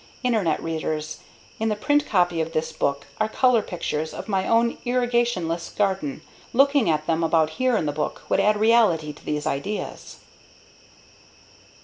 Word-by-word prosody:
_ -, -, -25 dB, 0.2 s
Internet 215 Hz, -10 st, +1 dB
Readers: 155 Hz, -1 st, -3 dB, 0.4 s
In 220 Hz, 0 st, 0 dB
the 210 Hz, -, 0 dB
print 290 Hz, +7 st, +1 dB
copy 175 Hz, -4 st, +2 dB
of 160 Hz, +1 st, -4 dB
this 160 Hz, 0 st, -1 dB
book 140 Hz, 0 st, -1 dB
are 215 Hz, 0 st, +1 dB
color 250 Hz, 0 st, +3 dB
pictures 160 Hz, -5 st, -4 dB
of -, -, -7 dB
my 190 Hz, -3 st, 0 dB
own 230 Hz, +1 st, +2 dB
"irrigationless" 240 Hz, -9 st, 0 dB
garden. 190 Hz, -8 st, -1 dB, 0.3 s
Looking 275 Hz, -, +4 dB
at 155 Hz, -1 st, 0 dB
them 165 Hz, 0 st, 0 dB
about 160 Hz, -1 st, +2 dB
here 255 Hz, -3 st, +3 dB
in 160 Hz, -, -1 dB
the 145 Hz, -, 0 dB
book 150 Hz, +1 st, -4 dB
would -, -, +1 dB
add 210 Hz, +1 st, +3 dB
reality 210 Hz, -9 st, +3 dB
to -, -, -18 dB
these 150 Hz, 0 st, -3 dB
ideas. 155 Hz, +8 st, -4 dB
185 Hz, 160 wpm, -24 LUFS, 155-230 Hz, 0.4 s, Looking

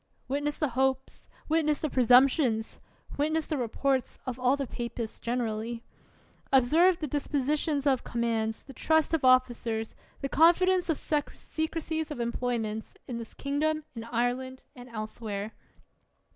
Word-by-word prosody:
Witness 290 Hz, +2 st, -1 dB
the 300 Hz, -, 0 dB
hopes, 265 Hz, +1 st, -1 dB, 0.2 s
witness 305 Hz, -1 st, +2 dB
the 310 Hz, -, +1 dB
presumptions, 250 Hz, -2 st, +4 dB, 0.4 s
witness 310 Hz, +2 st, +1 dB
the 310 Hz, -, -2 dB
reports 260 Hz, +1 st, -1 dB
of 255 Hz, -1 st, -4 dB
all 250 Hz, +2 st, +3 dB
the 280 Hz, -, -2 dB
papists 235 Hz, -2 st, -5 dB
generally. 230 Hz, -1 st, -2 dB, 0.7 s
Observe 315 Hz, +8 st, +5 dB
the 315 Hz, -, -3 dB
dispositions 290 Hz, +1 st, 0 dB
of 265 Hz, -3 st, +2 dB
commands, 225 Hz, -2 st, -1 dB
the 270 Hz, -, -12 dB
trust 315 Hz, +5 st, +2 dB
of 320 Hz, -, +1 dB
officers, 240 Hz, -3 st, +2 dB, 0.3 s
the 275 Hz, -, -1 dB
confidence 355 Hz, +4 st, +4 dB
of 320 Hz, -, +2 dB
secrecies 315 Hz, +1 st, -2 dB
of 295 Hz, -, -6 dB
employments, 235 Hz, -2 st, -2 dB
in 240 Hz, -2 st, -4 dB
this 230 Hz, -, -9 dB
kingdom, 305 Hz, +2 st, -1 dB
in 230 Hz, -, -5 dB
Ireland, 245 Hz, +2 st, -2 dB
and 245 Hz, -1 st, -11 dB
elsewhere. 215 Hz, -2 st, -5 dB
260 Hz, 130 wpm, -29 LUFS, 235-300 Hz, 0.7 s, Observe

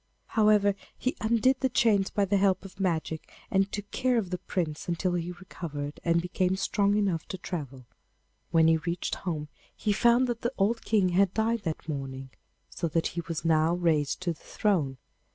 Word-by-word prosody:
However, 210 Hz, -3 st, +4 dB, 0.2 s
he 255 Hz, -, -1 dB
undid 235 Hz, +4 st, +3 dB
the 265 Hz, -, +1 dB
chains 210 Hz, -5 st, +3 dB
by 205 Hz, -, +1 dB
the 200 Hz, +1 st, +2 dB
help 195 Hz, -1 st, +2 dB
of 190 Hz, 0 st, -12 dB
magic, 160 Hz, -4 st, -2 dB, 0.2 s
and 195 Hz, 0 st, +2 dB
took 205 Hz, -1 st, -6 dB
care 255 Hz, -1 st, +1 dB
of 195 Hz, -6 st, -1 dB
the 180 Hz, -, -2 dB
Prince 155 Hz, -5 st, -3 dB
until 175 Hz, +1 st, 0 dB
he 175 Hz, 0 st, -2 dB
recovered 155 Hz, -5 st, -6 dB
and 170 Hz, 0 st, +2 dB
became 180 Hz, +1 st, 0 dB
strong 200 Hz, +1 st, +1 dB
enough 190 Hz, -6 st, 0 dB
to 190 Hz, -, -5 dB
travel. 140 Hz, -9 st, -6 dB, 0.6 s
When 160 Hz, -1 st, +4 dB
he 165 Hz, 0 st, +5 dB
reached 170 Hz, +2 st, -3 dB
home 155 Hz, -5 st, -3 dB, 0.3 s
he 210 Hz, -, 0 dB
found 240 Hz, +4 st, +4 dB
that 240 Hz, -2 st, -3 dB
the 240 Hz, +2 st, -1 dB
old 220 Hz, +4 st, +1 dB
King 205 Hz, -4 st, +3 dB
had 185 Hz, +1 st, +2 dB
died 225 Hz, +1 st, +1 dB
that 160 Hz, -1 st, -3 dB
morning, 135 Hz, -3 st, -5 dB, 0.4 s
so 170 Hz, -, -3 dB
that 165 Hz, +1 st, 0 dB
he 170 Hz, -, -2 dB
was 165 Hz, 0 st, -4 dB
now 160 Hz, +1 st, +3 dB
raised 160 Hz, -4 st, +1 dB
to 175 Hz, -2 st, 0 dB
the -, -, -20 dB
throne. 160 Hz, -11 st, 0 dB
185 Hz, 190 wpm, -28 LUFS, 165-205 Hz, 0.6 s, he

